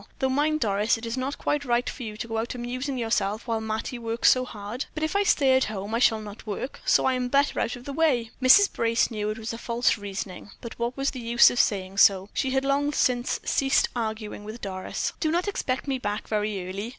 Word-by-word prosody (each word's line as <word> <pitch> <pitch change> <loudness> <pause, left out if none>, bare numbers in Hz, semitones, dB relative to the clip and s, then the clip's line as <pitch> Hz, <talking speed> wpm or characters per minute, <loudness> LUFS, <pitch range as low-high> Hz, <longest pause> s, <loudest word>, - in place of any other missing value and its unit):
Though 265 - 0
mind, 300 +3 +1
Doris, 210 +2 +1
it 225 - -8
is 230 +1 -3
not 265 +2 -3
quite 295 -1 -1
right 240 -2 0
for - - -6
you 215 -3 -6
to 230 - -5
go 225 -1 -2
out 235 +3 -3
amusing 255 +3 -4
yourself 220 -3 -1
while 225 -3 -1
Mattie 220 +3 -4
works 230 0 +3
so 255 0 +1
hard." 215 +3 -6
"But 310 - -3
if 315 - -1
I 405 - +4
stay 275 -9 +3
at 260 - +3
home 205 0 -5
I 230 - +1
shall 225 -3 +3
not 210 +1 -10
work, 215 +6 -5
so - - +4
I 265 - +3
am 250 -1 -1
better 280 +3 +2
out - - -1
of 245 0 -12
the 280 - -5
way." 265 -7 +1
Mrs. 390 +11 +6
Brace 230 +1 +1
knew 210 -1 -2
it 215 - -3
was 225 +1 -5
false 235 0 0
reasoning; 200 -1 -6
but 235 -1 -9
what 235 +2 -2
was 275 0 0
the 255 - -7
use 235 0 +5
of 245 - -2
saying 195 -1 0
so; 195 0 +5
she 265 - 0
had 265 +1 0
long 285 +1 +1
since 250 -3 +1
ceased 270 -1 +2
arguing 220 -2 -4
with 215 +3 -8
Doris. 185 -2 -4
"Do 315 - 0
not 350 +5 0
expect 275 -10 -2
me 265 -2 -1
back 205 -2 -3
very 210 -3 -2
early. 200 +4 -5
235 Hz, 240 wpm, -26 LUFS, 215-265 Hz, -, Mrs